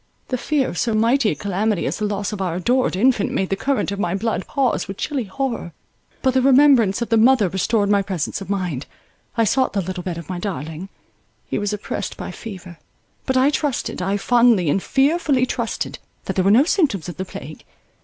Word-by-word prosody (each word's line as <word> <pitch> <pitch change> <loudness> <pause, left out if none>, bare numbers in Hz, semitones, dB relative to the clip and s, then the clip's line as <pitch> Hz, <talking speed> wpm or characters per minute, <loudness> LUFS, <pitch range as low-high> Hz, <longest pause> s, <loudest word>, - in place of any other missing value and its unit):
The 255 - 0
fear 290 -1 0
of - - -4
so 230 -3 0
mighty 230 +2 +3
a - - -1
calamity 200 -1 -1
as - - -2
the 210 - 0
loss 205 0 -3
of 200 - -4
our 180 -3 -1
adored 245 +5 +1
infant 220 +1 +2
made 190 - -1
the 195 - +1
current 270 -1 -1
of 200 - -4
my 175 -2 0
blood 215 -1 -2
pause 270 -7 0
with 195 0 -6
chilly 270 -5 -2
horror; 230 - -3 0.5
but 260 -1 +3
the 260 - +3
remembrance 255 -6 +5
of - - -7
the 225 - +3
mother 230 -2 +5
restored 200 +3 +1
my 200 0 +3
presence 190 -2 -3
of 195 - -8
mind. 180 -9 -2 0.5
I 230 - +4
sought 260 +5 +1
the 200 - 0
little 185 0 -5
bed 175 -2 -4
of 170 - -8
my 180 -2 -4
darling; 165 -1 -5 0.6
he - - -2
was 205 0 -1
oppressed 210 -1 -4
by - - -6
fever; 185 -6 -9 0.5
but 260 -1 +1
I 265 +3 +4
trusted, 290 -9 -2
I 195 +3 0
fondly 230 -7 +3
and 195 - +1
fearfully 275 - +2
trusted, 235 -2 -3 0.3
that - - -3
there 185 - +1
were - - +5
no 230 +7 +6
symptoms 295 - +1
of 175 - -7
the 190 - -3
plague. 155 -4 -9
210 Hz, 215 wpm, -21 LUFS, 190-255 Hz, 0.6 s, no